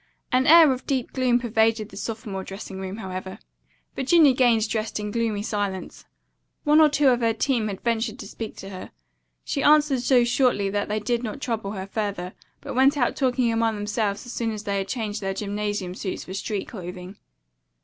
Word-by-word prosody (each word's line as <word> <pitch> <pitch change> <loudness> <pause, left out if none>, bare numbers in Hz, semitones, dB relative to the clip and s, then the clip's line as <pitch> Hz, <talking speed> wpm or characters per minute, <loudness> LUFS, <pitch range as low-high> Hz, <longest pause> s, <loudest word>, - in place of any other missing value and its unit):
An 255 0 +3
air 325 -2 +8
of 255 - -8
deep 260 -3 -1
gloom 255 -2 +2
pervaded 225 -2 +1
the - - -13
sophomore 215 -4 -5
dressing 195 0 -8
room, 190 +1 -5
however. 190 -2 -6 0.6
Virginia 290 +1 +5
Gaines 235 -4 +3
dressed 215 0 -2
in 210 0 -4
gloomy 220 -2 -1
silence. 205 -3 -4 0.6
One 300 +1 +5
or 310 - +7
two 290 -1 +3
of 245 -2 +3
her 230 -2 +1
team 230 -3 0
ventured 230 -1 -1
to - - -8
speak 225 -2 -7
to 195 - -9
her. 185 -1 -8 0.5
She 280 - -2
answered 295 -2 +4
so 250 0 +4
shortly 240 -5 +2
that 205 0 -1
they 210 +1 -1
did 235 +3 -1
not 225 0 -5
trouble 225 -6 -3
her 190 -2 -5
further, 195 -3 -3 0.3
but - - -6
went 270 +3 +4
out 245 -3 +1
talking 250 -3 +1
among 225 -1 +1
themselves 205 0 -2
as 245 - -8
soon 230 -1 -1
as 215 -1 -5
they 200 -1 -1
had 195 - -3
changed 215 -1 -3
their 195 -1 -2
gymnasium 205 -2 -3
suits 190 0 -5
for 185 - -8
street 200 +1 -3
clothing. 180 -2 -8
220 Hz, 190 wpm, -24 LUFS, 200-250 Hz, 0.6 s, air